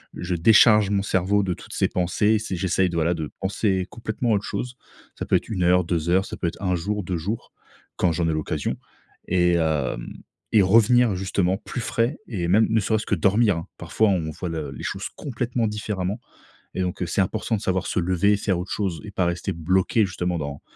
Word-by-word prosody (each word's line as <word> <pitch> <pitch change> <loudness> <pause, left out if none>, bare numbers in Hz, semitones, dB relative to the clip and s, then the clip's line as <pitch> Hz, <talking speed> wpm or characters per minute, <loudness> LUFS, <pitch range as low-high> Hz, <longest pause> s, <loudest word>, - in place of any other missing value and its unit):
je 90 +1 -3
décharge 105 +3 +6
mon 100 -1 +1
cerveau 100 +1 +1
de 95 -2 -1
toutes - - -11
ces - - +1
pensées, 105 +5 +1
si 105 -3 -4
j'essaie 95 +1 +1
de, 85 - -5
voilà, 85 +1 +2
de 80 -3 -4
penser 95 -1 0
complètement 115 0 -2
autre 100 -1 +1
chose. 125 +4 -4 0.4
Ça - - -3
peut - - +3
être - - -1
1 100 -5 -2
heure, 90 +1 +4
2 85 -1 -1
heures, 95 +2 +3
ça - - -7
peut 85 - -1
être 85 - -5
1 90 -2 0
jour, 105 +4 -2
2 90 0 -2
jours, 100 +8 -5 0.4
quand 90 - +2
j'en 85 +1 0
ai - - +1
l'occasion. 75 -1 -2 0.5
Et 90 -1 +3
hem, 75 -7 -1 0.4
et 110 - +6
revenir 115 +4 +5
justement 95 0 0
plus 120 +3 -6
frais 115 +6 0
et 90 -5 -2
même 105 +5 +4
ne 110 - +3
serait-ce 110 +1 0
que - - +1
dormir. 100 -1 +2
Parfois, 110 - +1
on 85 -5 0
voit 90 - -6
le 80 -4 -4
les 65 - -9
choses - - -4
complètement 120 -3 -2
différemment. 105 -1 -3 0.6
Et - - -2
donc 90 0 -3
c'est 85 - 0
important 110 +4 -2
de - - -6
savoir 95 -1 -1
se - - 0
lever, 95 +4 +2
faire 100 -3 -1
autre 90 +2 -5
chose 95 -6 -2
et 105 - -7
pas 95 - 0
rester 85 0 -2
bloqué 95 +6 +1
justement 90 -1 -2
dans 70 -1 -5
95 Hz, 210 wpm, -24 LUFS, 85-105 Hz, 0.6 s, décharge